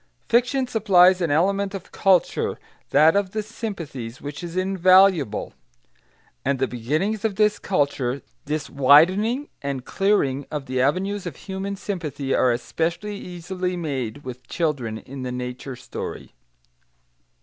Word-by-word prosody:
Fiction 250 +3 +2
supplies 190 -6 +5
an 170 - +1
element 195 +6 +1
of 190 - -8
culture, 190 -3 +2 0.3
that 155 +4 +5
of 200 -2 0
the 215 -1 -1
sympathies, 165 - -6
which 145 +3 -7
is 175 +1 -6
invaluable. 185 - +4 0.9
And 140 0 +1
the 130 0 0
beginnings 155 - -1
of 220 -3 0
this 210 +1 +2
culture, 140 -6 -1 0.2
this 150 0 -2
widening 185 - +4
and 140 -2 -4
clearing 145 -10 +1
of 150 -3 -4
the 130 -1 -1
avenues 185 +8 0
of 160 - -6
human 195 0 -5
sympathy, 160 -9 -3
are 125 - +3
especially 170 - -2
easily 180 0 -4
made 140 -5 -4
with 125 -1 -9
children 140 -10 -1
in 130 +5 -9
the 125 -1 -4
nature 125 +1 -5
story. 125 - -7
170 Hz, 135 wpm, -23 LUFS, 135-195 Hz, 0.9 s, supplies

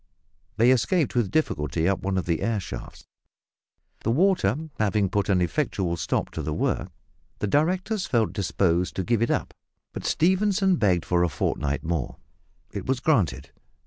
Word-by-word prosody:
They 120 +3 +5
escaped 140 +5 +2
with 120 -6 +1
difficulty 80 - 0
up 95 -1 +1
one 95 0 -1
of 95 - -1
the 85 -2 -1
air 115 -2 0
shafts. 95 - -8 0.9
The - - -3
water 140 - +3 0.2
having 105 -2 +1
put 100 -2 0
an 95 -2 +3
effectual 85 +1 -1
stop 80 -4 -2
to - - -4
the - - -3
work, - - -1 0.5
the 105 - -2
directors 180 - 0
felt 115 -3 +1
disposed 90 -3 0
to 95 - -1
give 115 +4 +1
it 115 - +2
up, - - -1 0.4
but - - -6
Stephenson 190 +1 +2
begged 90 - +2
for 90 -1 +1
a 90 - +2
fortnight 75 0 -2
more. 80 -5 -2 0.6
It - - -6
was 130 -1 +1
granted. 85 - +1
100 Hz, 165 wpm, -25 LUFS, 85-135 Hz, 0.9 s, They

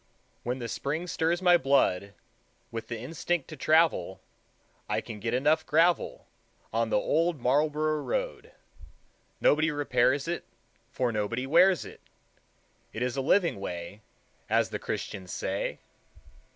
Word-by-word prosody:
When 125 +2 -2
the 120 -2 -5
spring 150 +8 -3
stirs 175 +1 0
my 175 -1 +7
blood 100 - +1 0.6
With 115 -1 -5
the 115 - -4
instinct 160 +5 -2
to 155 - -7
travel, 155 - +2 0.7
I - - +1
can 110 -2 -8
get 115 +3 -1
enough 150 +5 +2
gravel 165 +3 +2 0.5
On 115 0 +1
the - - +2
Old 165 +7 +1
Marlborough 150 +4 +1
Road. - - -3 0.9
Nobody 155 +2 +3
repairs 145 -1 +1
it, 175 +1 -2 0.5
For 125 -2 -1
nobody 115 +4 -2
wears 175 +5 +4
it; - - -12 0.9
It 115 - -3
is 125 0 -1
a 135 - 0
living 170 - +2
way, 90 +2 -6 0.5
As - - +2
the - - -3
Christians 95 -2 -5
say. 95 +1 -2
140 Hz, 135 wpm, -28 LUFS, 115-165 Hz, 0.9 s, my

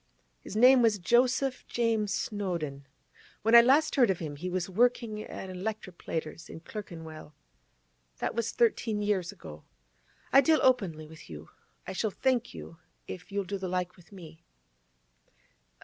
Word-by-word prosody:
His 190 - -10
name 250 +3 +7
was 225 -3 +3
Joseph 250 +6 +2
James 225 -3 0
Snowdon. 170 -11 -3 0.6
When 225 +2 +2
I 235 - +11
last 275 +6 +3
heard 245 -5 +5
of 190 - +1
him, 155 -4 -6
he 175 +6 -5
was 180 -1 -2
working 225 +1 +1
at 190 -3 -8
a - - -7
'lectroplater's 180 -5 -5
in 160 - -9
Clerkenwell. 160 -6 -9 0.8
That - - -2
was 230 0 -2
thirteen 230 - +1
years 195 -3 0
ago. 75 - -12 0.7
I 275 - +8
deal 315 +2 +4
openly 195 -12 +2
with 160 +1 -14
you; 75 -1 -10 0.4
I 190 - -5
shall 220 +3 -1
thank 245 +3 0
you 165 - -10 0.3
if 180 +2 -9
you'll 200 0 -1
do 195 +1 -5
the 190 - -4
like 180 0 -2
with 175 +2 -21
me. 165 -5 -13
200 Hz, 155 wpm, -29 LUFS, 170-235 Hz, 0.8 s, I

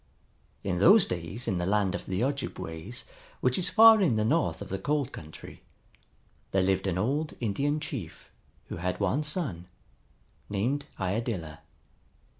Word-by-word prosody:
In 90 -3 -1
those 200 - +7
days 90 +8 -5
in 90 - 0
the 90 - -1
land 100 -2 +2
of - - -5
the 95 +4 -1
Ojibways, 120 - -4 0.4
which 125 +4 +1
is 180 - +1
far 225 -1 +8
in 150 - +3
the 110 0 +1
north 155 +7 +1
of - - -8
the 95 - -3
cold 140 +4 -1
country, 80 0 -11 0.9
there 95 -1 +2
lived 95 0 +1
an 90 -2 0
old 145 +10 -1
Indian 140 +7 0
chief 110 - -7 0.4
who - - -5
had 90 +2 -2
one 105 +9 +1
son, 150 - -2 0.8
named 130 +9 -1
Iadilla. 95 -5 -3
105 Hz, 150 wpm, -28 LUFS, 90-145 Hz, 0.9 s, far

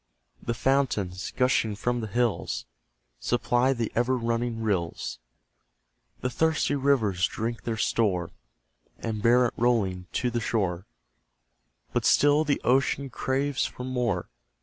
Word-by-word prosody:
The 120 - -2
fountains, 120 -8 0
gushing 125 -4 +2
from 120 +3 -1
the 110 - -4
hills, 120 +1 -1 0.5
Supply 120 +1 +1
the 120 -4 -2
ever 120 +2 +1
running 115 -1 -1
rills; 90 - -2 1.0
The 125 - 0
thirsty 160 +2 +1
rivers 120 -11 +2
drink 115 +1 -4
their 115 -1 -2
store, 95 -7 +1 0.7
And 110 -2 -4
bear 120 +3 +5
it 120 - -1
rolling 100 -7 +1
to 125 -1 0
the 120 0 -1
shore, 95 -5 -1 1.1
But - - 0
still 145 +1 +5
the 145 -2 0
ocean 135 +1 +1
craves 135 +2 0
for 125 - -9
more. 120 -8 -1
120 Hz, 125 wpm, -27 LUFS, 105-130 Hz, 1.1 s, bear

